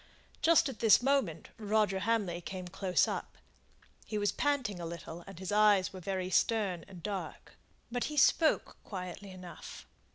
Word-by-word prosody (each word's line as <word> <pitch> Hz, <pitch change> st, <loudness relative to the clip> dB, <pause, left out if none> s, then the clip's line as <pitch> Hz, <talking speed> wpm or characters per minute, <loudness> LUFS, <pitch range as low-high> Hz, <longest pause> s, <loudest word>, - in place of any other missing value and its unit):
Just 330 Hz, -1 st, +5 dB
at 255 Hz, -6 st, -6 dB
this 225 Hz, +1 st, +6 dB
moment 245 Hz, -, 0 dB
Roger 210 Hz, -2 st, +1 dB
Hamley 200 Hz, -5 st, 0 dB
came 185 Hz, 0 st, -6 dB
close 180 Hz, +1 st, +1 dB
up. -, -, -5 dB, 0.7 s
He 215 Hz, -, -4 dB
was 205 Hz, 0 st, +1 dB
panting 265 Hz, -10 st, 0 dB
a 170 Hz, -, -5 dB
little, 170 Hz, 0 st, -8 dB
and 195 Hz, -3 st, -10 dB
his 190 Hz, +2 st, -5 dB
eyes 205 Hz, -3 st, +4 dB
were 190 Hz, -, -7 dB
very 185 Hz, 0 st, -3 dB
stern 195 Hz, -6 st, +1 dB
and 180 Hz, -4 st, -12 dB
dark; 200 Hz, -2 st, -5 dB, 0.4 s
but 245 Hz, 0 st, -1 dB
he 300 Hz, -, -5 dB
spoke 315 Hz, +3 st, +3 dB
quietly 185 Hz, 0 st, -7 dB
enough. 185 Hz, -2 st, -10 dB
195 Hz, 160 wpm, -32 LUFS, 180-225 Hz, 0.7 s, this